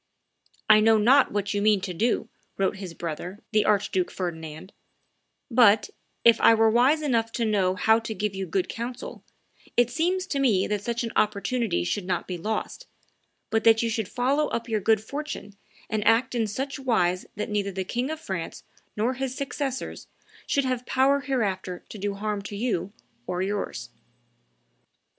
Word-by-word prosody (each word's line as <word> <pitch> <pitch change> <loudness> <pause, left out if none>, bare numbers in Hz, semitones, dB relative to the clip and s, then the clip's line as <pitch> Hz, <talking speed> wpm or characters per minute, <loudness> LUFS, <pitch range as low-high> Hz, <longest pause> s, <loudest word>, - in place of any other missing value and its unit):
"I 215 0 +8
know 220 +1 +5
not 255 +6 +5
what 205 0 -1
you 205 - 0
mean 210 -1 +4
to 185 -1 -4
do," 220 +5 0 0.3
wrote 195 0 0
his 185 -4 -7
brother, 175 +4 -5
the 215 -1 +3
Archduke 200 -3 +1
Ferdinand; 160 0 -6 0.8
"but, 225 -3 +5 0.3
if 230 -1 +6
I 230 - +7
were 225 0 +4
wise 265 +7 +3
enough 230 -5 +1
to 235 - 0
know 195 -4 +1
how 220 +4 +4
to 225 -1 -5
give 210 +1 -2
you 190 -1 -4
good 180 +2 0
counsel, 240 +2 -6 0.5
it 240 0 +4
seems 365 +3 0
to 285 -7 -2
me 220 -9 +3
that 210 -1 -2
such 235 +2 -2
an 230 - -3
opportunity 215 0 0
should 180 +2 -2
not 185 - -1
be 180 - -3
lost, 220 - -4 0.6
but 225 0 +1
that 225 0 +5
you 230 - 0
should 220 -3 -2
follow 275 +5 +1
up 230 +1 -3
your 220 -2 -1
good 220 +1 +3
fortune 280 -5 -6 0.3
and 215 -1 -1
act 225 +3 +3
in 230 -3 0
such 270 +7 -4
wise 185 -9 +1
that 210 +1 -4
neither 200 -1 -1
the 190 0 -3
King 245 +7 -2
of 315 0 -4
France 190 - -5 0.3
nor 230 +5 +1
his 260 0 -4
successors 275 -1 -4 0.4
should 280 -1 +1
have 255 -1 -2
power 270 +2 +3
hereafter 195 -10 -2
to 215 - -9
do 200 0 -2
harm 210 0 -3
to 205 +1 -7
you 200 -4 -1 0.4
or 180 +1 -1
yours." 200 +1 -4
220 Hz, 175 wpm, -26 LUFS, 195-245 Hz, 0.8 s, I